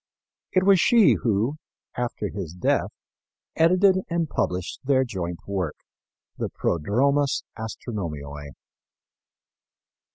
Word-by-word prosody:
It 185 - +3
was 195 -1 +6
she 230 +1 +6
who, 115 +6 +1 0.4
after 120 -4 -3
his 90 -6 -6
death, 90 - +1 0.7
edited 185 +3 +4
and 170 -1 0
published 90 -8 -2
their 130 -1 +3
joint 90 -8 -4
work, 95 -6 -2 0.6
the - - -1
Prodromus 135 - +1
Astronomiæ. 80 - -6
115 Hz, 95 wpm, -25 LUFS, -, 0.7 s, was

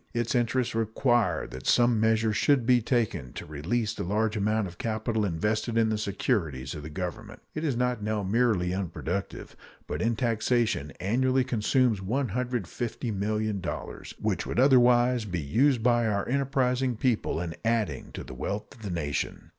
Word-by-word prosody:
Its 120 -1 0
interests 120 0 +1
require 115 - +1
that 65 0 -8
some 120 -2 +4
measure 110 0 +2
should 130 +2 +3
be 125 0 +4
taken 110 - -1
to - - -7
release 100 +10 -2
the - - -4
large 105 +4 0
amount 105 +1 +1
of 85 -1 -12
capital 110 0 -1
invested 105 +6 -1
in 115 -1 +3
the 110 - 0
securities 85 - -1
of 75 - -6
the 75 - -7
Government. 95 +6 -6
It 155 - -4
is 140 -7 0
not 125 -2 0
now 105 0 -1
merely 100 -4 +1
unproductive, 90 0 -4 0.3
but - - -4
in 115 +1 +1
taxation 115 - 0
annually 130 +7 +2
consumes 125 -1 +1
$150,000,000, 110 -3 -3
which - - -1
would - - -1
otherwise 125 -2 +5
be 90 -4 -3
used 120 - +2
by 120 -1 +3
our 100 -2 -1
enterprising 130 -1 +1
people 115 -8 0
in 85 -1 -3
adding 115 -2 -1
to - - -6
the - - -9
wealth 100 - -4
of 125 - -17
the 105 - -5
nation. 75 -5 -3
110 Hz, 160 wpm, -28 LUFS, 100-120 Hz, 0.3 s, otherwise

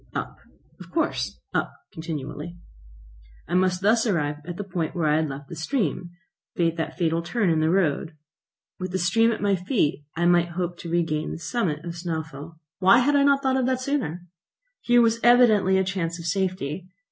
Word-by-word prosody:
Up, - - -4 0.4
of - - -11
course; 330 - -1
up - - 0 0.2
continually. 160 +1 -6 0.9
I 170 - -5
must 180 0 +2
thus 225 +3 +3
arrive 150 -7 0
at 175 -1 -5
the 205 - -3
point 180 -5 -3
where 170 -3 0
I 150 0 +3
had 155 -1 0
left 140 +1 -7
the 170 - -8
stream, 175 - -2 0.5
that 165 -1 -1
fatal 165 -1 +1
turn 195 +1 0
in 160 - +2
the 155 0 +2
road. 165 -3 0 0.6
With 185 -1 -5
the - - +1
stream 225 +6 +3
at 220 - -4
my 200 -1 +3
feet, 180 - 0
I 170 +1 0
might 175 0 +3
hope 175 -1 -2
to 170 - -7
regain 160 -3 0
the - - -5
summit 170 -5 -2
of 170 - -4
Snæfell. 160 -2 -6 0.2
Why 190 +5 +6
had 275 +4 +3
I 285 - +5
not 280 0 +3
thought 265 0 +2
of 255 -1 +1
that 260 -1 +1
sooner? 250 - -2 0.6
Here 240 0 +4
was 230 0 +2
evidently 220 -6 +5
a 190 - +3
chance 180 -3 -2
of 170 - -9
safety. 180 -2 -2
175 Hz, 190 wpm, -25 LUFS, 165-215 Hz, 0.9 s, Why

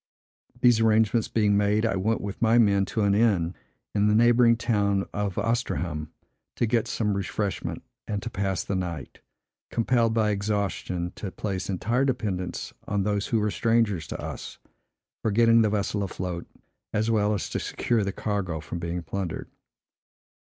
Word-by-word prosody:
These 120 -2 +5
arrangements 110 0 +3
being 105 -2 +2
made, 105 +2 +2
I 110 - +1
went 105 +4 0
with 100 +2 -6
my 115 0 +4
men 100 -4 +4
to 110 - -2
an 100 -1 +3
inn, 100 -6 +2 0.4
in 105 0 +3
the 105 - +3
neighboring 120 +1 +5
town 100 -4 +1
of 100 -3 -2
Oistreham, 95 -9 -1 0.5
to - - +1
get 115 0 +1
some 105 -2 0
refreshment, 100 0 -3 0.2
and 105 -1 -1
to 115 - -3
pass 95 -2 -1
the - - -3
night; 85 -7 -4 0.5
compelled 115 -1 +2
by 110 -2 +3
exhaustion 100 -4 -2
to 100 - -4
place 95 -1 -4
entire 115 +7 0
dependence 105 -9 -2
on 100 -1 0
those 105 0 0
who 115 - +1
were 105 0 0
strangers 115 -7 +1
to - - -5
us, - - -6 0.6
for - - 0
getting 115 +2 +5
the 110 - +3
vessel 105 0 -1
afloat, 90 -2 -4 0.4
as 110 +2 +1
well 105 -1 +2
as 100 - -3
to - - -1
secure 115 -3 0
the 100 - -1
cargo 95 -6 -2
from 80 +3 -6
being 85 0 -3
plundered. 95 -1 -4
105 Hz, 165 wpm, -26 LUFS, 95-115 Hz, 0.6 s, These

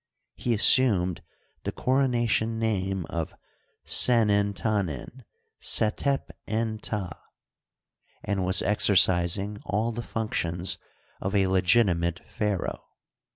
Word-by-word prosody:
He 120 -2 -1
assumed 100 -6 +4 0.4
the - - -3
corona 130 -2 0
tion 115 0 0
name 95 -5 -2
of 85 -2 -4 0.5
Senert' 100 -4 +4
Tanen 105 - -3 0.4
Setep 135 +6 0 0.2
en 110 0 -2
Ptah, 95 -7 -4 1.1
and 100 -2 -2
was 95 +1 +2
exer 105 0 +1
cising 95 +4 +2
all 110 +3 -1
the 120 +1 -5
functions 90 -6 -2 0.4
of 95 +2 -3
a 100 -1 +3
legitimate 90 -2 +1
pharaoh. 105 -3 -3
100 Hz, 105 wpm, -26 LUFS, 95-115 Hz, 1.1 s, assumed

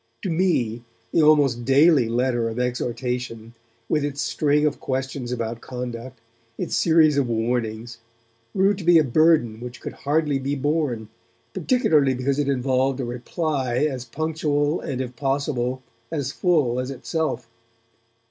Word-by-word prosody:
To 190 - -1
me 160 -10 +1 0.3
the - - +3
almost 145 -6 +4
daily 135 -1 +4
letter 120 -1 0
of 115 - -6
exhortation, 125 -2 -3 0.3
with 150 -2 +1
its 145 -1 -3
string 150 0 +1
of 150 -1 0
questions 130 -1 -3
about 115 -1 -3
conduct, 125 0 -6 0.4
its - - -2
series 160 -3 +4
of 130 -4 0
warnings, 115 0 -2 0.5
grew 195 +1 +3
to 190 -2 -7
be 170 0 +6
a 160 - +5
burden 140 -5 +3
which 125 0 -8
could - - -7
hardly 145 -1 0
be 140 +2 -2
borne, 140 -6 -1 0.4
particularly 160 - +2
because 135 +3 -1
it 145 -1 0
involved 130 0 +1
a 130 - -2
reply 130 +1 -1
as 130 -4 -4
punctual 150 +2 -1
and 130 -2 -3
if 125 -1 -6
possible 135 -1 -1 0.3
as 140 -4 -2
full 145 -10 +1
as 125 +1 -3
itself. 135 -2 -3
135 Hz, 145 wpm, -23 LUFS, 120-150 Hz, 0.5 s, be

